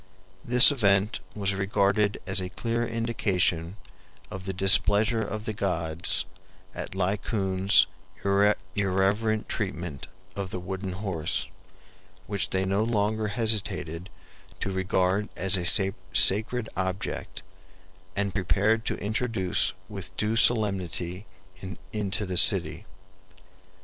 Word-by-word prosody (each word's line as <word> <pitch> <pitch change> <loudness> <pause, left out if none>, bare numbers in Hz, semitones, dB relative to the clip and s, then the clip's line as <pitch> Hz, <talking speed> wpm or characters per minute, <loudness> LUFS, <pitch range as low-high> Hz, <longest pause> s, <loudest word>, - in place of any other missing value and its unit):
This 125 +4 +8
event 105 -5 +1 0.2
was 100 -2 -1
regarded 100 +1 0
as 95 0 +1
a 90 - -5
clear 115 +4 -3
indication 100 -6 -2 0.5
of 95 0 -8
the 95 - -3
displeasure 105 +4 +5
of 110 0 -5
the 110 - -3
gods 85 -4 -1 0.5
at - - -7
Laocoon's 95 0 +2 0.9
irreverent 105 +3 0
treatment 90 - -4 0.3
of 100 -2 -5
the 90 - -5
wooden 95 +1 -6
horse, 90 -5 -3 0.8
which 100 -2 -2
they 95 0 -1
no 100 +3 0
longer 110 -1 -1
hesitated 100 -6 -2 0.5
to 100 - -3
regard 95 +2 -1
as 95 +1 +7
a 95 +2 +3 0.2
sacred 110 +4 +3
object, 95 +1 -4 0.7
and 100 -1 -2
prepared 105 +4 0
to - - -1
introduce 110 -3 -1
with 95 -3 -9
due 105 +1 -1
solemnity 95 -5 +1 0.7
into 105 0 -1
the 90 -1 -4
city. - - +3
100 Hz, 110 wpm, -26 LUFS, 95-110 Hz, 0.9 s, This